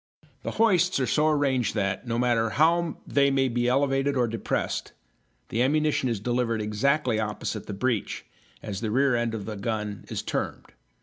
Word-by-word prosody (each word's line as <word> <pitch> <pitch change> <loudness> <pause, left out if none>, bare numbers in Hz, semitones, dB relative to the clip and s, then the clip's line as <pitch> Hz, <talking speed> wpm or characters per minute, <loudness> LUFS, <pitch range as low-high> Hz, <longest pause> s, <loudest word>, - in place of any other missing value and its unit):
The - - -4
hoists 185 -7 +3
are 130 - +1
so 150 +4 +2
arranged 135 -7 +1
that, 100 +2 -1
no 115 0 -1
matter 120 -2 +2
how 165 +5 +2
they 140 -1 +3
may 135 -1 +2
be 120 0 0
elevated 135 +1 +2
or 120 -1 +2
depressed, 115 0 -2 0.6
the 115 - 0
ammunition 150 0 +2
is 115 -4 -1
delivered 120 0 0
exactly 115 +3 +1
opposite 105 0 -3
the 105 - -4
breech, 110 +1 -2 0.4
as 100 -1 -5
the 110 - -1
rear 135 +3 +3
end 120 -1 0
of 105 -2 -6
a 110 - -4
gun 105 -1 -3
is - - -3
termed. - - -3
120 Hz, 175 wpm, -26 LUFS, 110-140 Hz, 0.6 s, hoists